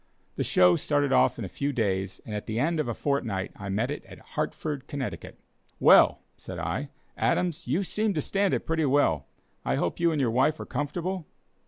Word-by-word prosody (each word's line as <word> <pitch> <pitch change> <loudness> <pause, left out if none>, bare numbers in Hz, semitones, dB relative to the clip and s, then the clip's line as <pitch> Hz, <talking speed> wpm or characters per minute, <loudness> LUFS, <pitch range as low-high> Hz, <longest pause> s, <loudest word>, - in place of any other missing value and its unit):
The - - -1
"show" 90 -1 +5
started 145 -2 +1
off 130 0 +4
in 115 - -4
a - - -4
few 140 +9 -2
days, 95 -6 -1
and 110 - -6
at 105 - -4
the 110 +1 -2
end 160 +4 +1
of 155 - 0
a 120 - -1
fortnight 115 -10 -1
I 100 -1 -7
met 110 +7 0
it 145 - -5
at - - -12 0.2
Hartford, 145 -3 -3
Connecticut. 140 -4 -5 0.4
"Well," - - +6 0.2
said - - -8
I, - - -3 0.3
"Adams, 175 -3 0
you 155 +11 +1
seem 210 +1 -1
to 155 - +1
stand 200 0 +1
it - - -4
pretty 160 -1 +1
well. 130 - +2 0.4
I - - 0
hope 85 - -1
you 170 -1 +3
and 155 - -1
your 125 -4 +2
wife 135 +6 +2
are - - -5
comfortable?" 170 +4 -3
140 Hz, 205 wpm, -27 LUFS, 110-160 Hz, 0.4 s, Well